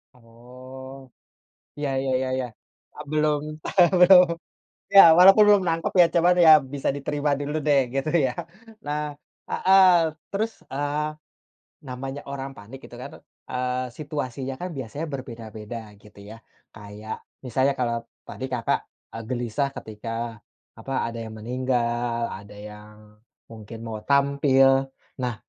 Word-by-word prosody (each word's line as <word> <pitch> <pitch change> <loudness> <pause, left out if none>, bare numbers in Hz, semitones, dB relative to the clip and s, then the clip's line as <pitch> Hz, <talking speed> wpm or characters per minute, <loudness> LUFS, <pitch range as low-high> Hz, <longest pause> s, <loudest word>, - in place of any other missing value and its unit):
Oh. 130 +2 -13 0.7
Iya 145 -1 -2
iya 135 -1 -2
iya 130 0 -2
iya. 130 -1 -2 0.5
Eee, 150 - -8
belum 150 -1 +1 0.6
belum 180 0 +8 0.7
ya, 195 - +12 0.2
walaupun 195 +4 +8
belum 205 -2 +5
nangkep 165 0 -1
ya, - - +4
coba 170 +1 +4
deh 175 - +4
ya, 155 - +11 0.2
bisa 140 - -1
diterima 145 +1 -2
dulu 145 +2 -4
deh, 145 -2 +5 0.2
gitu 135 +3 -1 0.2
ya. 125 - 0 0.5
Nah 150 +1 -2 0.5
heeh. 190 0 +5 0.5
Terus, 220 +3 -1 0.2
eee, 145 +2 -2 0.8
namanya 135 +2 -6
orang 135 -1 -5
panik 115 +7 -12
itu - - -12
kan, - - -8 0.4
eee, 125 0 -1
situasinya 135 -3 -5
kan 180 - -4
biasanya 135 +5 -5
berbeda-beda, 115 -4 -8 0.2
gitu 105 -1 -17
ya. 110 +2 -10 0.4
Kayak, 105 +1 -9 0.2
misalnya 130 +2 +1
kalau 120 -1 0 0.3
tadi - - -7
Kakak, 120 -2 0 0.3
eee, 115 - -7
gelisah 125 +2 -2
ketika, 115 +1 -6 0.4
apa, 135 - -8 0.2
ada 115 0 -7
yang 110 - -9
meninggal, 120 -1 -1
ada 100 +1 -10
yang 105 0 -11 0.5
mungkin 110 0 -10
mau 110 -1 -6
tampil. 135 -1 +3 0.3
Nah, 125 -2 -2
130 Hz, 130 wpm, -24 LUFS, 115-145 Hz, 0.8 s, ya